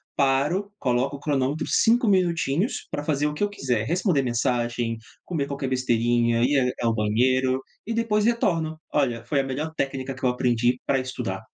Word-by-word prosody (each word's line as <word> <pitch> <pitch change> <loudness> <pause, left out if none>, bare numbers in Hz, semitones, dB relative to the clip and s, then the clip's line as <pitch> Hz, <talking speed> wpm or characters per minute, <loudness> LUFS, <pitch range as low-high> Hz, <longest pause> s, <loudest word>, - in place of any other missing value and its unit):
paro, 150 +10 +1
coloco 130 +3 0
o - - -16
cronômetro 145 +1 -1
5 235 +1 +3
minutinhos 175 - +1
pra 145 - -3
fazer 150 -1 0
o 150 - -3
que 150 - -2
eu 205 - +1
quiser, 125 - -1
responder 170 - +1
mensagem, 120 -1 -1 0.3
comer 155 -6 -2
qualquer 140 -1 -3
besteirinha, 120 -2 +1
ir 135 +2 +3 0.2
a - - -1
ao 115 - +1
banheiro, 130 +5 +2 0.2
e 230 - -3
depois 225 -2 +1
retorno, 165 -9 +1 0.2
olha, 120 -5 0
foi 135 +3 +1
a - - -4
melhor 145 +4 -4
técnica 135 -1 -2
que 130 - -14
eu 125 - +4
aprendi 125 0 +1
para 135 -1 +2
estudar. 115 -5 -4
135 Hz, 175 wpm, -25 LUFS, 120-160 Hz, 0.3 s, eu